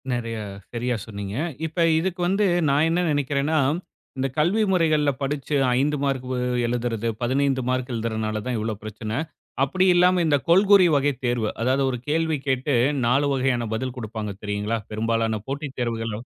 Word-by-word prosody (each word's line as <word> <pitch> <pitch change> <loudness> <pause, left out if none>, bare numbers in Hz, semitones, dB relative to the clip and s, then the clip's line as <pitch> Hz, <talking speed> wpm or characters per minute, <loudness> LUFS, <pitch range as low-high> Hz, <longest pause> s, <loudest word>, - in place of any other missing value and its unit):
நிறையா 115 -2 -3 0.3
சரியா 120 +1 -1
சொன்னீங்க. 100 -2 -6 0.3
இப்ப 160 +2 -2 0.2
இதுக்கு 180 +1 -2
வந்து, 195 +3 +2 0.2
நான் 145 +3 +3
என்ன 170 +2 +1
நினைக்கிறேன்னா, 145 +2 0 0.6
இந்தக் 135 +1 -3
கல்வி 190 +8 +3
முறைகள்ல 155 -5 +3
படிச்சு 140 +1 -2 0.2
5 150 +2 +1
மார்க் 135 -2 -1
வ - - -1 0.3
எழுதறது 115 -1 -1
15 135 +2 +1
மார்க் 130 0 -1
எழுதறனாலதான் 110 +1 -2
இவ்ளோ 110 +1 -2
பிரச்சனை. 110 +1 -5 0.5
அப்படி 185 +7 +1
இல்லாம 180 0 +4
இந்தக் 145 -5 +1
கொள்கூறி 195 +2 +6
வகை 145 +1 +2
தேர்வு. 120 -3 0
அதாவது 130 +3 +2
ஒரு 125 - -2
கேள்வி 160 0 +1
கேட்டு 135 +2 0 0.3
4 135 +5 +3
வகையான 130 -2 +1
பதில் 130 +3 -3
குடுப்பாங்க 110 -2 -5
தெரியுங்களா? 105 +2 -1
பெரும்பாலான 115 0 0
போட்டித் 140 0 -5
தேர்வுகளோ 115 -3 -2
130 Hz, 145 wpm, -24 LUFS, 115-150 Hz, 0.6 s, கொள்கூறி